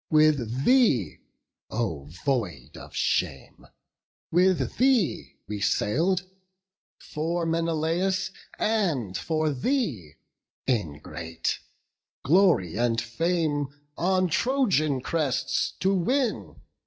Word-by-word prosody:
With 140 -5 +3
thee, 215 - +3 0.5
O 85 -12 -2 0.2
void 100 - -2
of - - -11
shame! 70 -1 -1 0.6
with 175 -7 +2
thee 250 - +2
we 105 0 -4
sail'd, 170 - +1 0.7
For 165 +3 -3
Menelaus 165 +3 0 0.3
and 165 - 0
for 155 - 0
thee, 135 - -1 0.5
ingrate, 80 - -2 0.6
Glory 155 - +3
and 115 -1 +1
fame 145 +4 0 0.3
on 185 +1 +2
Trojan 175 - +1
crests 150 -3 0
to 190 +1 +3
win. 240 +6 0
155 Hz, 85 wpm, -26 LUFS, 115-185 Hz, 0.7 s, With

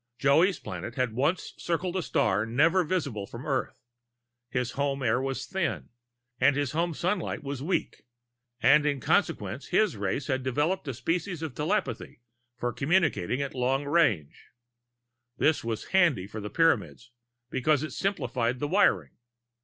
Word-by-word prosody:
Joey's 160 +7 +4
planet 105 +4 -7
had 125 -3 0
once 145 +10 0
circled 175 +1 -2
a 185 - +1
star 105 - +1
never 155 +11 +3
visible 140 - -2
from 120 +2 -9
Earth; 135 -4 -2 0.7
his 125 -1 -1
home 140 0 -1
air 120 +1 +2
was 135 0 -3
thin 190 -3 -2 0.5
and 135 +2 +4
his 145 -2 -1
home 165 +1 -1
sunlight 185 -1 -2
was 140 -2 -4
weak, 165 -3 -2 0.6
and 145 +4 +6
in 145 -2 0
consequence - - 0
his - - +2
race 135 - -2
had 130 -2 -1
developed 145 +8 -1
a 135 - -3
species 165 - -2
of 155 -5 -4
telepathy 155 - -2 0.4
for 120 -1 -2
communicating 140 - +1
at 140 - -5
long 130 +2 0
range. 140 - +1 0.9
This 155 0 +2
was 115 -1 -4
handy 170 - +3
for 105 +2 -7
the 105 - -5
Pyramids, 160 -6 +1 0.4
because 150 +2 +2
it 155 - -5
simplified 130 -11 -1
the 145 - -2
wiring. 125 - +3
140 Hz, 150 wpm, -28 LUFS, 125-165 Hz, 0.9 s, and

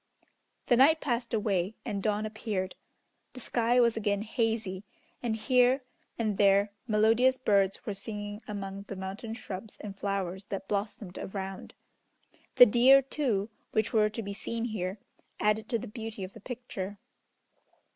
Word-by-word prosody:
The 245 - +4
night 305 +5 +6
passed 245 -5 -1
away, 205 -3 0
and 205 -4 -2
dawn 210 +1 0
appeared. 210 -4 -3 0.6
The 255 - -9
sky 240 0 +2
was 235 -2 +4
again 205 -2 0
hazy, 220 -4 -1 0.4
and 230 -2 0
here 250 +3 +3 0.3
and 215 -4 -1
there 200 0 +5 0.2
melodious 225 +4 +4
birds 200 -6 +2
were 210 - -2
singing 205 +1 -6
among 200 -1 -5
the 200 - -5
mountain 195 +4 -5
shrubs 205 -2 -7
and 200 -2 -7
flowers 195 -1 -3
that 195 -1 -5
blossomed 200 -2 -3
around. 190 -1 -6 0.8
The 245 - +11
deer, 250 +4 +6
too, 235 -7 -1 0.2
which 220 +1 +1
were 215 -1 +4
to 220 +1 -5
be 200 0 -5
seen 230 +3 -3
here, 195 -4 -3 0.4
added 210 +1 +1
to 240 - +1
the - - -7
beauty 220 -2 -6
of 185 +1 -7
the - - -12
picture. 210 -5 -6
215 Hz, 150 wpm, -30 LUFS, 195-230 Hz, 0.8 s, The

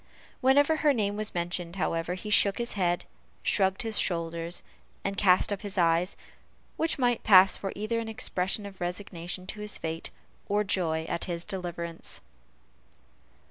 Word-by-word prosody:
Whenever 285 +4 +4
her 300 -2 +4
name 205 -4 0
was 215 -1 -3
mentioned, 175 0 -2
however, 170 -1 -1
he 210 +3 -6
shook 200 -1 +5
his 235 0 -2
head, 175 -3 0 0.4
shrugged 190 0 +2
his 225 -2 0
shoulders, 170 -1 -1 0.4
and 200 0 -2
cast 190 0 +4
up 195 - -5
his 200 -2 -5
eyes; 170 +1 +2 0.6
which 325 0 0
might 245 -3 +2
pass 190 -2 +7 0.2
either 215 +3 -2
for - - 0
an 225 - -5
expression 200 -2 -1
of 195 -2 -10
resignation 180 0 -4
to 210 - -7
his 210 0 -3
fate, 160 0 -4 0.4
or 205 +1 +2
joy 165 -5 0
at 165 - -3
his 170 -2 -3
deliverance. 170 -3 -5
190 Hz, 155 wpm, -28 LUFS, 175-210 Hz, 0.6 s, pass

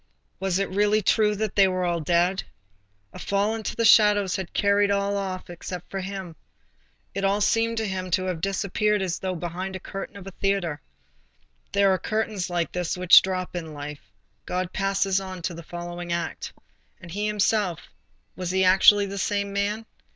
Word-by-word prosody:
was 190 -1 0
it 195 - 0
really 205 +2 +3
true 210 +1 +3
that 215 0 -2
all 195 -1 +6
were 175 -2 0
dead? 175 +4 +2 0.7
A - - -9
fall 200 +2 0
into 225 -1 -4
the 230 - +1
shadows 205 -3 +5
had 190 -2 -5
carried 200 0 +2
off 200 0 +1 0.3
all 175 - -8
except 180 0 -8
himself. 190 -3 -5 0.8
It 195 - -3
all 195 +1 +2
seemed 230 +2 +1
to 220 -1 -1
him 185 -1 -4
to 185 +1 +1
have 180 -3 -3
disappeared 200 +2 0
as 185 -1 -2
though 185 -1 -3
behind 180 +3 -5
the - - -5
curtain 195 +2 -7
of 195 - -10
a 195 - -7
theatre. 175 -7 -1 0.9
There 200 -1 +4
are 185 - 0
curtains 215 -4 -2
like 175 -3 -1
this 180 0 -2
which 180 0 +8
drop 185 -1 -3
in 160 -3 -5
life. 145 0 -7 0.5
God 180 0 -2
passes 195 -1 +1
on 185 -2 -7
to 180 - -2
the 170 - -8
following 175 +1 -7
act. 170 0 -3 0.5
And 170 - -11
he 205 +4 -2
himself—was 190 -3 -3
he 190 +1 +2
actually 195 +2 +6
the 200 0 -5
same 200 +1 -1
man? 205 +2 -1
190 Hz, 175 wpm, -25 LUFS, 180-200 Hz, 0.9 s, which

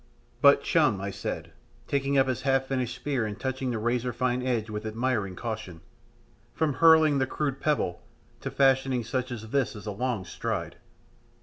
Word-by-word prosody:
"But, - - +6
chum," 100 - +3
I 100 +1 -3
said, - - -5 0.4
taking 140 0 0
up 135 0 +4
his 130 -3 -1
half 135 -1 +2
finished 130 -2 -2
spear 135 -3 -1
and 105 0 -6
touching 130 0 -2
the 120 - -1
razor 120 +2 0
fine 125 +1 0
edge 120 -4 -1
with 105 -1 -5
admiring 110 -3 -1
caution, 110 -6 -5 0.7
"from 155 -3 +1
hurling 155 0 +6
the 130 - +1
crude 140 -1 -2
pebble 145 - 0 0.4
to - - -4
fashioning 135 -2 +2
such 125 +3 -3
as 110 -2 -7
this 135 -5 0
is 105 -1 -9
a 105 - -3
long 115 -2 -2
stride. - - -4
125 Hz, 175 wpm, -27 LUFS, 110-135 Hz, 0.7 s, But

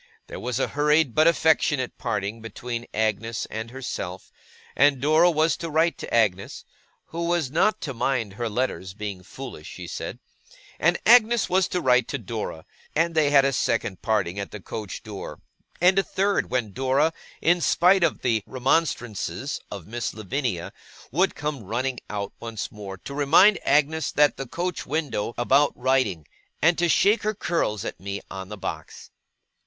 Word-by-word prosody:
There - - -8
was 125 0 -2
a - - 0
hurried 150 -2 +2
but 155 +5 +4
affectionate 155 -5 +2
parting 105 +2 -3
between 120 +1 -6
Agnes 110 +1 -1
and 110 +1 -5
herself; 110 -8 -6 0.4
and 140 -1 +4
Dora 155 +5 +5
was 160 -1 +2
to 165 - -5
write 160 +2 +1
to - - -7
Agnes 100 -4 0 0.4
(who 170 +1 -3
was 170 -6 0
not 175 +8 +2
to 140 - -4
mind 115 -4 -1
her 120 +2 -3
letters 100 -5 -2
being 105 -3 -5
foolish, 100 - -9
she - - -8
said), - - -5 0.6
and 175 +2 +3
Agnes 235 -1 +5
was 185 0 +3
to 180 - -2
write 125 -2 +3
to 140 - -3
Dora; 110 -8 -5 0.3
and 165 +2 +2
they 155 -3 +3
had 140 -1 +5
a 135 - +1
second 110 -5 -1
parting 100 -4 0
at 100 - -4
the 105 - -8
coach 100 +1 -7
door, 105 -4 -8 0.4
and 185 +3 +5
a - - +2
third 200 +1 0
when 120 -6 -1
Dora, 135 +6 +2 0.3
in 175 +1 +3
spite 180 +3 +4
of 165 - 0
the 115 -3 +2
remonstrances 130 - -1
of 100 -5 -7
Miss 120 +3 -4
Lavinia, 110 -4 -3 0.4
would 185 +8 +2
come 150 -3 -3
running 120 +5 -2
out 100 -1 -4
once 115 -5 -5
more 100 -2 -8
to 140 - -9
remind 160 +8 +5
Agnes 150 +2 +2
at 145 -1 +4
the 135 - -5
coach 175 +6 -3
window 140 -8 -2
about 135 +4 +3
writing, 125 - +1 0.3
and 170 +3 +4
to 175 0 +2
shake 205 +6 +4
her 215 0 -1
curls 165 - -1
at - - -5
me 100 +1 -4
on 95 -1 -7
the 105 - -7
box. - - -7
130 Hz, 170 wpm, -25 LUFS, 110-160 Hz, 0.6 s, Dora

